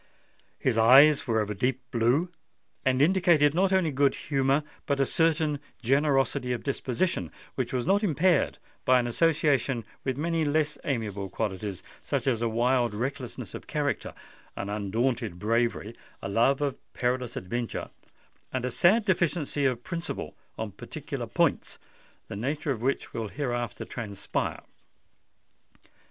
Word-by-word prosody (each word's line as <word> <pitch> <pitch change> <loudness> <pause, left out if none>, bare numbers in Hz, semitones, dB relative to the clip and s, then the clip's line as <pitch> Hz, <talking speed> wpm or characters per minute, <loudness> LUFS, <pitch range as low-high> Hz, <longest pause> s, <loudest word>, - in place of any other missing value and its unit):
His 115 -3 +1
eyes 135 +6 +7
were 110 -2 +2
of 105 0 -3
a - - -1
deep 125 +5 0
blue, 125 +9 +2 0.5
and 130 +1 +3
indicated 170 -4 +4
not 190 +3 +2
only 185 -5 +3
good 140 0 +2
humour 140 +1 +1 0.2
but 140 -1 +1
a 135 - +4
certain 155 -1 +1 0.2
generosity 135 0 +2
of 120 - -4
disposition 130 - -1 0.2
which - - -2
was 125 -2 -1
not 195 +3 +3
impaired 175 -2 +2 0.3
by 130 0 +5
an 120 - 0
association 140 -3 +1 0.2
with 130 -1 -2
many 165 +1 0
less 155 0 0
amiable 105 -7 -2
qualities—such 100 -2 -4
as 120 -4 +1
a 115 - +1
wild 120 0 +1
recklessness 130 +2 -4
of - - -8
character, - - -2 0.4
an 100 - -4
undaunted 110 0 -1
bravery, 115 +2 0 0.2
a - - -5
love 120 +8 +2
of 140 -2 -1 0.2
perilous 125 -1 -1
adventure, 115 +6 -4 0.6
and 130 -1 -2
a 125 - -2
sad 210 +6 +4
deficiency 165 -6 +1
of 125 -2 -2
principle 170 -2 -5 0.2
on 110 -2 -4
particular - - -6
points, - - 0 0.5
the - - -6
nature 140 +7 -2
of 115 -5 -3
which 135 +3 -1
will 115 -2 -3
hereafter 120 -1 -3
transpire. 100 -4 -4
130 Hz, 140 wpm, -28 LUFS, 115-150 Hz, 0.6 s, eyes